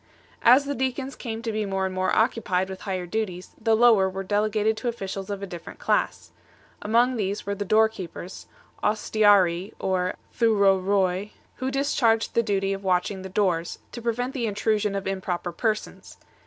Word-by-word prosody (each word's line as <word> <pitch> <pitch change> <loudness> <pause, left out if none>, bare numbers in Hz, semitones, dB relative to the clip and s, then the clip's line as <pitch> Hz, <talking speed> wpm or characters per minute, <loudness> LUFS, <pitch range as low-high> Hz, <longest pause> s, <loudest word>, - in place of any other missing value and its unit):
As 255 +4 +6
the 285 - -2
deacons 265 +1 -2
came 225 -2 -6
to 230 - -2
be 215 0 -1
more 195 -1 -1
and 190 - -3
more 185 0 0
occupied 190 -5 +1
with 190 - -8
higher 185 -3 -3
duties, 185 -2 -4
the 225 0 +3
lower 220 -5 +5
were 190 +1 -5
delegated 215 +2 +1
to 230 - -4
officials 195 -4 -4
of 200 -1 -4
a - - -1
different 175 -3 -9
class. - - -1 0.5
Among 235 +4 +2
these 200 0 -2
were 200 - -1
the 205 0 -4
door 220 +3 +5
keepers 185 -3 -9 0.4
(ostiarii 205 -4 +3
or 185 -1 -1 0.2
Bupcopol) 195 -3 +2 0.3
who 260 - -2
discharged 260 -5 +1
the 235 - +3
duty 195 -3 0
of 195 0 -6
watching 185 +1 0
the 190 - -7
doors, 180 -4 0
to 240 - -7
prevent 245 +3 -2
the 240 -4 -1
intrusion 210 0 0
of 195 - -3
improper 185 -2 -3
persons. 215 +5 -3
205 Hz, 170 wpm, -25 LUFS, 190-225 Hz, 0.5 s, As